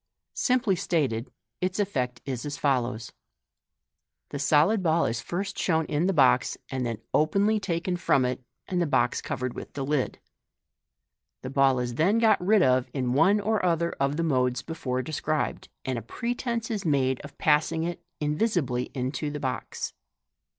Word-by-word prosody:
Simply 250 -6 +2
stated, 140 - -1 0.3
its 185 0 -1
effect 125 -12 -1
is 130 -3 -3
as 145 -1 -4
follows: 125 -5 0 0.6
— - - -58
The 140 - -4
solid 155 +9 +4
ball 165 -1 +2
is 115 +1 -1
first 195 +8 -4
shown 160 -3 +1
in 155 +5 0
the - - +3
box, 130 -7 +3
and 130 -1 -2
then 115 -2 -2 0.2
openly 200 +8 +3
taken 180 -2 -1
from 135 -6 +2
it, 125 0 -2 0.3
and 180 -1 0
the 170 - +1
box 120 -4 +1
covered 125 0 -3
with - - -8
the 135 -2 -3
liJ. 140 -2 0 1.3
The 130 - -5
ball 135 -1 +4
is 125 -1 -2
then 175 - +3
got 220 -5 +4
rid 205 +1 +4
of 130 -2 +3
in 125 -2 0
one 185 +9 +4
or 210 0 0
other 170 -1 +1
of 140 +2 +1
the 165 - 0
modes 125 -5 +1
before 130 -6 -3
de 155 - -7
scribed, 155 +1 -2 0.2
and 130 -2 -1
a - - -9
pretence 235 - -3
is 210 -3 -2
made 135 -5 +1
of 145 - -12
passing 155 +1 +2
it 175 0 -4 0.2
in 150 -1 0
visibly 145 - 0
into 130 +4 -2
the 150 0 -5
box. 130 -2 -4
150 Hz, 175 wpm, -27 LUFS, 130-180 Hz, 1.3 s, solid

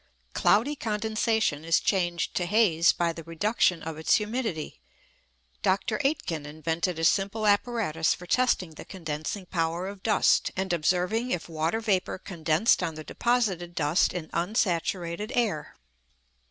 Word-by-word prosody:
Cloudy 260 +8 +3
condensation 220 - 0
is 165 0 +3
changed 175 -3 0
to 175 - -1
haze 180 -5 +4
by 170 -1 -1
the 165 - -9
reduction 170 +2 +1
of 160 -1 -6
its 160 - +3
humidity. 210 - -3 0.8
Dr. 205 +3 0
Aitken 185 - -1
invented 160 +3 -2
a 165 - -3
simple 200 +5 +1
apparatus 205 -6 +1
for 180 - -11
testing 195 -5 +1
the 155 - -10
condensing 165 +2 -5
power 170 +1 -2
of 200 -1 -8
dust, 210 -1 +3
and 190 -1 -1
observing 180 +8 +1
if 175 -8 -2
water 165 +5 -1
vapour 195 -4 0
condensed 170 +2 +1
on 160 - -2
the 155 - -7
deposited 190 -6 -1
dust 150 +3 +2
in 175 -3 -5
unsaturated 180 +1 -1
air. 200 -11 -1
180 Hz, 140 wpm, -27 LUFS, 165-215 Hz, 0.8 s, haze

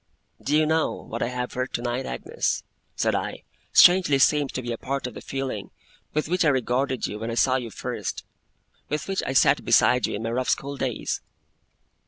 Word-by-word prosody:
'Do 150 +2 +2
you 155 - +4
know, 160 +1 +2
what 115 - -7
I - - +1
have 125 0 -4
heard 125 +1 -3
tonight, 120 +2 -2
Agnes,' - - -2 0.3
said - - +1
I, - - -3 0.3
strangely 175 -6 +6
seems 145 0 +3
to 130 - -3
be 120 - -3
a 115 - -3
part 140 0 -3
of 125 - -5
the - - -9
feeling 135 -7 -4 0.5
with 155 - 0
which 180 +2 +1
I - - +3
regarded 130 0 0
you 105 - -5
when 115 +1 -4
I 115 - -3
saw 130 +2 +3
you 120 -3 -5
first - - -5 0.6
with 150 +1 -2
which 195 -1 -1
I 130 - -1
sat - - +4
beside - - +4
you - - -3
in 105 - -5
my 115 - -2
rough 125 +2 -1
school 140 +1 -1
days? 130 -4 -2
130 Hz, 205 wpm, -25 LUFS, 120-145 Hz, 0.6 s, strangely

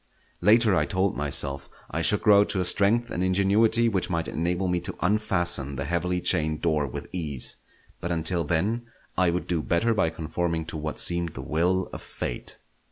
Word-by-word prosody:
Later, 105 +1 +5
I 75 -3 +2
told 95 +1 0
myself, 70 -1 -1 0.2
I - - -1
should - - +1
grow 100 -1 +7
to 100 - -2
a 90 - +1
strength 115 +6 +2
and 90 - -1
ingenuity 100 +5 +3
which 100 -5 0
might 85 -2 -1
enable 90 +4 -1
me 90 -1 +1
to 90 +2 -6
unfasten 85 -8 +1
the 70 +2 -3
heavily 90 +3 -1
chained 80 -4 0
door 75 -4 +1
with - - -7
ease; 75 -8 -3 0.4
but 90 - -4
until 85 +1 0
then 100 +10 -1 0.3
I 90 -1 +3
would 90 +1 -1
do 85 -3 -1
better 100 +9 +1
by 95 -7 +2
conforming 80 0 -2
to 80 - -6
what 75 0 -4
seemed 85 -2 0
the 65 - -6
will 90 +6 +1
of - - -6
Fate. - - -6
85 Hz, 185 wpm, -26 LUFS, 80-95 Hz, 0.4 s, grow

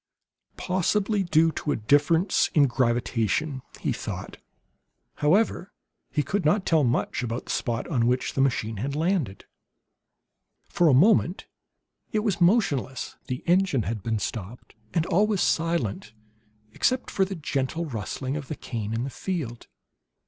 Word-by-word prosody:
"Possibly 195 +3 0
due 165 -2 +3
to 150 - -2
difference 150 - +3
in 145 -2 +6
gravitation," 125 +2 0 0.2
he - - 0
thought. - - -6 0.8
However, 195 +5 +2 0.4
he 150 - 0
could 195 +7 -1
not 185 +6 +2
tell 160 -3 +3
much 125 +1 0
about 120 0 -3
the - - -5
spot 120 -1 -2
on 120 -8 +1
which 125 +1 0
the 135 - +1
machine 115 -5 0
had 135 +7 -3
landed. 160 - -1 1.2
For 175 - +2
a 140 - +6
moment 185 - +3 0.7
it 215 -3 0
was 200 -4 -1
motionless; 160 - +1
the 125 0 -4
engine 175 - +2
had 105 +2 -3
been 110 +2 -1
stopped, 105 +3 -6 0.2
and 165 -2 +1
all 195 +4 +3
was 210 -3 0
silent 160 - 0 0.6
except 255 - 0
for 195 - +2
the 190 0 -3
gentle 150 +1 -2
rustling 130 +1 -4
of 145 -3 -5
the 155 - -4
cane 115 -4 -4
in 115 - -1
the 135 - -4
field. 145 -12 -4
145 Hz, 145 wpm, -26 LUFS, 120-180 Hz, 1.2 s, in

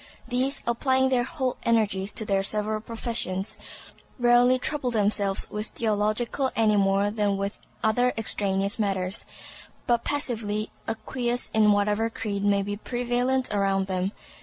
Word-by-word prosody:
These, 260 +2 0
applying 260 +2 +2
their 255 -2 +3
whole 260 -2 -2
energies 205 -4 +1
to 220 - -2
their 195 -1 +2
several 215 +2 -1
professions, 225 -4 -3 0.6
rarely 245 +1 +5
trouble 265 0 -1
themselves 205 -3 0
with 210 +1 -3
theological 220 +4 0
any 215 -2 +3
more 200 0 +3
than 205 -2 0
with 200 +1 -3 0.2
other 245 +3 +3
extraneous 200 -2 -1
matters, 195 -2 -1 0.6
but 235 -1 +2
passively 220 -7 -1 0.2
acquiesce 240 +2 -2
in 215 -1 +5
whatever 210 +2 +2
creed 210 -3 -3
may 200 -1 +3
be 205 +1 -3
prevalent 245 +2 0
around 195 -1 +1
them. 190 0 -1
215 Hz, 135 wpm, -26 LUFS, 200-245 Hz, 0.6 s, rarely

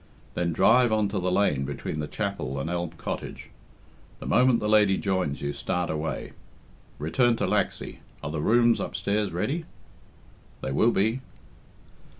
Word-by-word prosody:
Then 85 -1 0
drive 120 +7 +5
on 110 -2 +2
to 100 - -2
the 90 0 0
lane 90 -8 +2
between 70 +2 -4
the 75 - -2
chapel 100 -9 -3
and 80 +5 -3
Elm 85 -1 -1
Cottage. - - -6 0.7
The - - -8
moment 125 -2 +4
the 105 - -2
lady 105 -2 +4
joins 95 -8 -1
you, 70 0 -1
start 90 +3 -2
away. 80 0 -3 0.7
Return 120 - +2
to - - -1
Laxey - - -1 0.2
are 70 - -3
the 75 -1 -2
rooms 120 +4 +4
upstairs 105 0 -1
ready?" 140 - -2 1.0
"They 65 - -3
will 110 - +4
be." 110 +4 +1
95 Hz, 155 wpm, -26 LUFS, 80-110 Hz, 1.0 s, drive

